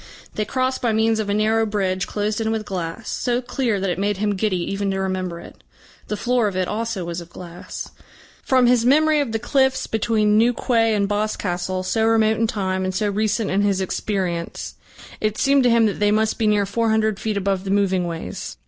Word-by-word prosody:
They 215 - -2
crossed 260 +3 -1
by 235 -3 +1
means 220 0 +2
of 210 -2 -2
a - - +1
narrow 220 +1 +2
bridge 195 -3 -1
closed 210 +1 -2
in 220 - 0
with 220 -1 -2
glass, 180 +2 -5
so 245 -1 -1
clear 245 -4 -1
that 190 -1 -1
it 180 - -3
made 205 0 0
him 205 +1 0
giddy 195 -1 0
even 195 0 -1
to 195 0 -1
remember 185 -2 -2
it. - - -14 0.4
The 210 - -3
floor 245 0 +1
of 190 -2 -3
it 185 -1 0
also 215 -4 -3
was 170 0 -4
of 170 - -12
glass. 175 0 -8 0.5
From 260 -2 +3
his 240 -1 +4
memory 305 +4 +4
of 280 -6 -1
the 225 - 0
cliffs 265 +3 +1
between 215 -1 +2
New 240 +2 +4
Quay 225 -3 +2
and 200 -1 +1
Boscastle, 185 -3 -2
so 220 +4 0
remote 220 -1 +3
in 225 - +1
time, 190 -3 -2
and 185 0 -2
so 205 +2 0
recent 215 +1 0
in 195 +2 +2
his 200 -2 +1
experience, 185 -3 -3 0.5
it 215 0 -1
seemed 275 0 +3
to - - +5
him 230 -1 +4
that 205 - -1
they 205 0 +3
must 215 +2 +1
be 220 - +2
near 205 -1 +3
four 225 +3 0
hundred 220 -2 +1
feet 215 -2 -2
above 195 -1 -1
the 195 - -5
moving 190 -3 +1
ways. 165 - -6
210 Hz, 220 wpm, -22 LUFS, 190-225 Hz, 0.5 s, to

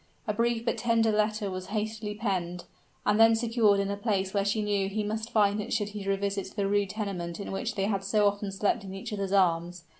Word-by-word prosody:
A 210 - 0
brief 230 +1 0
but - - 0
tender 230 -2 +3
letter 210 -1 0
was 185 0 -5
hastily 215 0 -3
penned, 180 -5 -2 0.4
and 210 +1 +3
then 225 0 +7
secured 225 -3 +3
in 200 0 0
a - - -1
place 200 -3 -1
where 200 -1 +2
she 210 +2 0
knew 200 -2 0
he 210 +2 -2
must 220 +2 -3
find 205 -1 +3
it - - -7
should 205 -3 0
he 205 -1 -7
revisit 195 0 -2
the 200 -2 0
rude 205 -1 +1
tenement 190 -5 -4
in 200 - -5
which 195 - -3
they 195 -2 0
had 195 -2 -1
so 205 +1 +3
often 205 0 -1
slept 205 +3 0
in 190 -1 -7
each 210 +3 -6
other's 195 -2 -2
arms. 175 -2 +2
205 Hz, 230 wpm, -28 LUFS, 195-215 Hz, 0.4 s, then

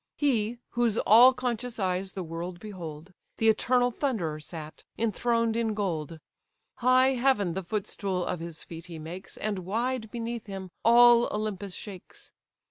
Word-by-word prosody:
He, 240 -5 +1
whose 235 -2 +1
all 240 +5 +8
conscious 250 -2 -3
eyes 190 -1 -1
the 190 - -4
world 170 +2 -6
behold, 175 -4 -8 0.2
The 225 - +4
eternal 245 +2 +3
Thunderer 205 - -2
sat, 155 0 -9
enthroned 230 +1 +1
in 225 -2 0
gold. 165 -6 -3 0.6
High 255 +1 +5
heaven 245 -8 +2
the 190 - -2
footstool 190 -1 -3
of 180 - -3
his 165 -1 -7
feet 165 +1 -10
he 170 -2 -8
makes, 165 +4 -9
And 205 -2 -2
wide 225 +5 -2
beneath 230 0 -5
him 190 -2 -7
all 240 0 +7
Olympus 205 -3 -3
shakes. 195 -4 -10
210 Hz, 145 wpm, -28 LUFS, 180-235 Hz, 0.6 s, all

